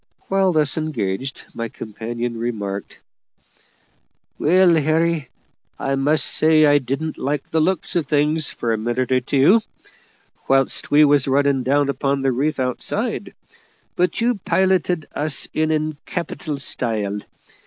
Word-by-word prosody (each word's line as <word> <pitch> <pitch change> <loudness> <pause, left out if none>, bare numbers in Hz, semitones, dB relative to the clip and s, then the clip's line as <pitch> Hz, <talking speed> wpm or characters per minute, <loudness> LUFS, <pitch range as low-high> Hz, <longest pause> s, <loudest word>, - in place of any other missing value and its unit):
Whilst 195 -2 +2
thus 150 -1 +2
engaged, 130 -4 -3
my 115 -1 -4
companion 115 +2 -5
remarked, 105 -4 -4 1.4
"Well, 180 +2 +4
Harry, 155 -1 +1 0.5
I 135 - -2
must 145 +2 +2
say 155 0 +4
I 145 0 +5
didn't 140 +5 -4
like 140 0 -3
the 160 - +2
looks 180 +2 0
of 165 -5 0
things, 150 +1 +1
for 115 -1 -2
a 110 - -2
minute 120 +3 -2
or 130 0 +3
two, 140 - +4 0.9
whilst 135 0 +2
we 150 +1 +6
was 145 -2 +3
running 140 0 +2
down 140 +2 +2
upon 140 0 -1
the 135 - +2
reef 140 +4 -1
outside; 125 -1 -3 0.6
but 180 +1 0
you 235 -2 +1
piloted 185 -4 +1
us 150 0 0
in 155 0 +1
in 155 -1 -1
capital 155 -2 -4
style. 110 -7 -2
145 Hz, 135 wpm, -21 LUFS, 125-155 Hz, 1.4 s, we